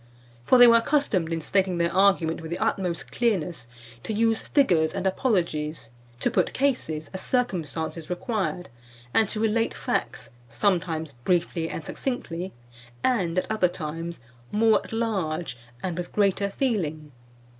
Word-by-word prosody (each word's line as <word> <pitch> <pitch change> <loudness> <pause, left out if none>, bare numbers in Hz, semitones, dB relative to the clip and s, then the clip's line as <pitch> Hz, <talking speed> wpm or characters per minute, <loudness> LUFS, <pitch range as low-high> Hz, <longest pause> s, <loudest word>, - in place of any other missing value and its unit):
For 255 - +6
they 245 - +10
were 230 -1 +8
accustomed, 230 - +1
in 165 -1 -1
stating 185 +2 +1
their 170 0 +1
argument 185 -5 +3
with 160 - -7
the 170 - -2
utmost 180 -3 -1
clearness, 180 - -1 0.3
to - - -5
use 225 +1 +2
figures 175 - +2
and 190 - -3
apologies, 170 - -1 0.3
to - - +1
put - - +1
cases, 240 - -1
as 190 - -4
circumstances 165 - -2
required, 185 - -2 0.4
and 220 -3 +3
to 215 - -2
relate 225 +1 +1
facts, - - -3 0.2
sometimes 165 - 0
briefly 170 -1 0
and 160 - -6
succinctly, 190 - -4 0.5
and, 185 -9 +1
at 185 - 0
other 215 -4 +3
times, 165 -1 -5 0.3
more 220 +1 +4
at - - -12
large 190 - -1 0.3
and 180 -2 -2
with 175 - -5
greater 200 -1 +2
feeling. 165 - -2
185 Hz, 145 wpm, -26 LUFS, 165-220 Hz, 0.5 s, they